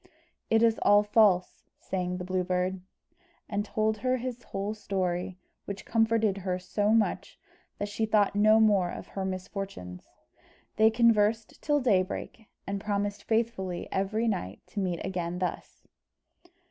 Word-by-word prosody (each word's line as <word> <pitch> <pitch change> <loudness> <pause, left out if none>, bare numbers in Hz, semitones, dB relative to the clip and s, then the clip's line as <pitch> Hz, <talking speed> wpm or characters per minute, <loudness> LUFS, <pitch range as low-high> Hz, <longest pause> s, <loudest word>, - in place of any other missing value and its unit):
"It 225 +1 +4
is 225 -1 +3
all 205 0 +5
false," 205 -4 +3 0.2
sang 180 -1 -3
the 180 - -5
Blue 185 0 -1
Bird, 180 +1 -1 0.7
and 205 -1 -1
told 215 +1 0
her 255 +1 +1
his 250 -1 -5
whole 200 +2 -4
story, 185 -3 -2 0.3
which 200 -1 -6
comforted 225 -3 +2
her 185 -1 -2
so 205 +3 -1
much 220 0 +1 0.4
that 205 - -3
she 220 +2 -2
thought 210 -2 +3
no 215 +2 +5
more 205 -5 +4
of - - -8
her 195 - -4
misfortunes. 185 - -6 0.7
They 220 0 +6
conversed 225 -1 +2
till 295 -1 +2
daybreak, 210 -1 -1 0.2
and 200 0 -3
promised 205 -1 -2
faithfully 220 -6 -1
every 215 +4 0
night 95 - -3
to 210 - -5
meet 180 -3 -2
again 180 -2 -3
thus. 180 0 -5
205 Hz, 145 wpm, -28 LUFS, 185-220 Hz, 0.7 s, They